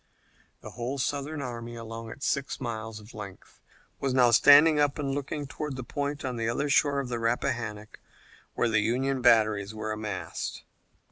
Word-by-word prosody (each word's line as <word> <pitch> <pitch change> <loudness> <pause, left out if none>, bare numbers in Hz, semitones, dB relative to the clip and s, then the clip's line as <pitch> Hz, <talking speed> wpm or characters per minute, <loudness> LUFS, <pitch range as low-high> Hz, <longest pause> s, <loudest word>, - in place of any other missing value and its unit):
The - - -9
whole 125 +3 -4
Southern 145 +2 -2
army, 120 -2 -6
along 115 0 -7
its 140 - -6
six 140 0 -1
miles 110 -3 -5
of 105 +2 -14
length, 100 -3 -10 0.4
was 135 -2 -1
now 125 -2 +5
standing 150 +5 +7
up 145 0 +2
and 140 -2 -2
looking 145 +1 -3
toward 145 0 -5
the 130 - -5
point 145 +3 -3
on 125 -2 -3
the 115 0 -1
other 140 +5 -1
shore 140 0 +3
of 135 - -3
the 120 -1 -2
Rappahannock 115 -2 -2 0.6
where - - +2
the 110 -2 +2
Union 130 +4 0
batteries 110 -3 +3
were 110 0 -3
massed. 105 -3 -5
120 Hz, 175 wpm, -28 LUFS, 110-140 Hz, 0.6 s, standing